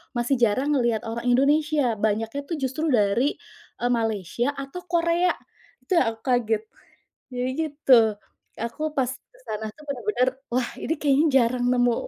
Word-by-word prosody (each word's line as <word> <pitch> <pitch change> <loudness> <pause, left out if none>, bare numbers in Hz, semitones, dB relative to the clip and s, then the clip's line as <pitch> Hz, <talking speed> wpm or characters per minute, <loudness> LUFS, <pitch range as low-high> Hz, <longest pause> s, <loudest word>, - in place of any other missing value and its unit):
masih 240 +3 +1
jarang 245 +6 +2
ngeliat 235 -4 +1
orang 235 +1 -4
Indonesia. 280 0 +3
Banyaknya 220 +5 -1
tuh 335 - -2
justru 270 +5 -2
dari, 230 +4 +2 0.4
eee, 245 0 0
Malaysia 225 +1 0
atau 275 +6 -7
Korea. 340 +1 +2 0.5
Itu 370 - -1
yang 225 -3 +1
aku 225 - -28
kaget. 230 -4 +1 0.7
Jadi 250 +1 -1
gitu. 290 -5 +4 0.6
Aku 305 +7 -3
pas 255 -2 +2
ke - - -16
sana 215 +1 -3
tuh 300 - -16
bener-bener, 265 0 0 0.2
wah, 250 0 +1
ini 320 - -2
kayaknya 285 +1 +3 0.2
jarang 245 +1 0
nemu 245 -1 +3
250 Hz, 150 wpm, -24 LUFS, 230-295 Hz, 0.7 s, gitu